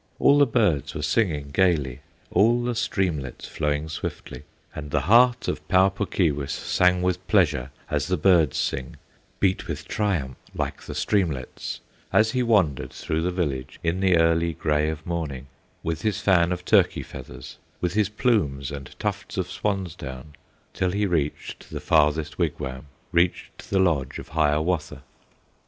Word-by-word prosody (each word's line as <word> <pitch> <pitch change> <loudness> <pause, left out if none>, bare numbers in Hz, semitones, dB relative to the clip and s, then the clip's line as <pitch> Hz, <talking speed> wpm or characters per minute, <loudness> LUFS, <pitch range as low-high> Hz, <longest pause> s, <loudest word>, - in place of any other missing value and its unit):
All 145 +1 +5
the 145 - +6
birds 105 - +1
were - - -3
singing 75 -10 0
gayly, 75 -7 +1 0.3
All 120 +3 +4
the 120 0 -1
streamlets 85 - -2
flowing 75 0 -1
swiftly, 75 -5 -6 0.3
And 75 -1 -7
the - - +1
heart 120 +3 +4
of - - -3
Pau 95 +1 +5
Puk 100 +1 -4
Keewis 75 -6 0
Sang 90 0 +2
with 90 0 -1
pleasure 80 - +2 0.2
as 75 0 -1
the 90 -1 +1
birds 80 -4 +4
sing, 65 -1 -2 0.4
Beat 95 -1 +1
with - - -5
triumph 85 - -1 0.2
like - - -3
the - - -8
streamlets, 80 -11 -1 0.3
As 110 0 +4
he 130 - 0
wandered 100 - +2
through 80 +1 -2
the 90 - 0
village, 70 -8 -3
In 85 +2 0
the 95 -2 +4
early 85 0 +2
gray 75 0 0
of 80 -1 -6
morning, 80 -7 -4 0.4
With 80 0 -2
his 110 +1 0
fan 90 -3 +3
of 90 0 -3
turkey - - +3
feathers, - - -10 0.2
With 90 -1 -1
his 105 -1 +2
plumes 95 - 0
and 70 -2 -8
tufts - - -4
of - - -2
swan's 95 -5 -2
down, 65 -2 -9 0.4
Till 90 - 0
he 100 +3 0
reached 80 -6 -2
the - - -5
farthest 75 0 +2
wigwam, 65 +2 -3 0.2
Reached 85 +1 0
the 100 - +1
lodge 80 -9 +1
of - - -9
Hiawatha. 75 -1 0
85 Hz, 160 wpm, -25 LUFS, 75-95 Hz, 0.4 s, the